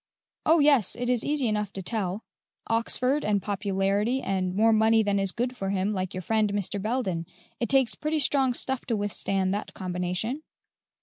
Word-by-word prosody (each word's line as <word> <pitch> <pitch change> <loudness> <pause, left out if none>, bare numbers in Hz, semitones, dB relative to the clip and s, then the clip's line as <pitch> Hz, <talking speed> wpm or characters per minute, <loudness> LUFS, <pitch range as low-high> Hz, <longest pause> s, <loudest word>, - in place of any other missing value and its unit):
"Oh, 325 +2 +6
yes, 285 - +4
it 245 +1 -1
is 245 -2 +2
easy 290 -4 +1
enough 210 -2 -1
to 190 - -3
tell: 205 0 -2 0.4
Oxford 250 +5 +1
and 210 -1 +1
popularity 200 +4 0
and 185 -5 -2
more 225 +2 +4
money 220 +1 +4
than 200 -1 +1
is 195 -1 -1
good 245 +3 -2
for 195 -5 -3
him, 195 +1 0
like 185 -2 -3
your 185 - -4
friend, 215 +1 +1
Mr. 200 0 -2
Belden. 195 -7 -2 0.3
It 235 - -1
takes 265 -4 +4
pretty 310 +1 -2
strong 270 -4 +2
stuff 265 0 -2
to 230 -3 0
withstand 195 -2 -1
that 205 - -5
combination." 180 +8 -3
215 Hz, 180 wpm, -27 LUFS, 195-245 Hz, 0.4 s, Oh